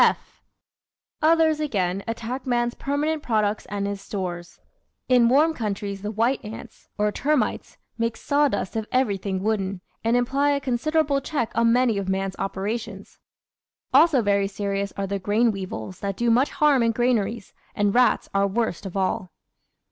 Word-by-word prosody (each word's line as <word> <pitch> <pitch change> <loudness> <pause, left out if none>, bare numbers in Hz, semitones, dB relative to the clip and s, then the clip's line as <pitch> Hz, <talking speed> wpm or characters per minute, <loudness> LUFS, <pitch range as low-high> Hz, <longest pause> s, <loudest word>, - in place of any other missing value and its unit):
(/) - - -62
Others, 320 -2 +3
again, 195 -10 -1
attack 235 +3 -4
man's 240 -1 +1
permanent 300 +2 -1
products 215 -5 0
and 200 0 -3
his 200 -1 -4
stores. 175 -4 -5 0.5
In 245 -2 +5
warm 305 +6 +4
countries 200 -5 -4
the 210 - -3
white 230 +5 0
ants 215 +1 -10
or 210 0 +1
termites 295 +5 -1 0.2
make 230 0 -1
sawdust 285 -10 0
of 220 -1 -2
everything 200 -7 0
wooden, 200 -3 -1 0.2
and 230 +2 +3
imply 275 +4 +2
a 280 - 0
con 255 -4 -1
siderable 305 -1 +1
check 270 -8 -2
on 230 0 +3
many 240 -4 +3
of 190 -1 -4
man's 190 0 -1
operations. 200 +1 -4 0.7
Also 300 -8 +5
very 200 -1 +2
serious 200 0 -3
are 200 - -1
the 200 +1 -3
grain 215 +5 +2
weevils 190 -2 -6
that 195 -1 -3
do 235 -1 +2
much 255 +5 +3
harm 295 -4 +3
in 230 -1 +2
granaries, 230 -3 0 0.2
and 205 -1 +1
rats 250 0 +3
are 200 0 +3
worst 200 -2 -2
of 190 - -6
all. 185 -1 -1
225 Hz, 160 wpm, -24 LUFS, 200-255 Hz, 0.7 s, In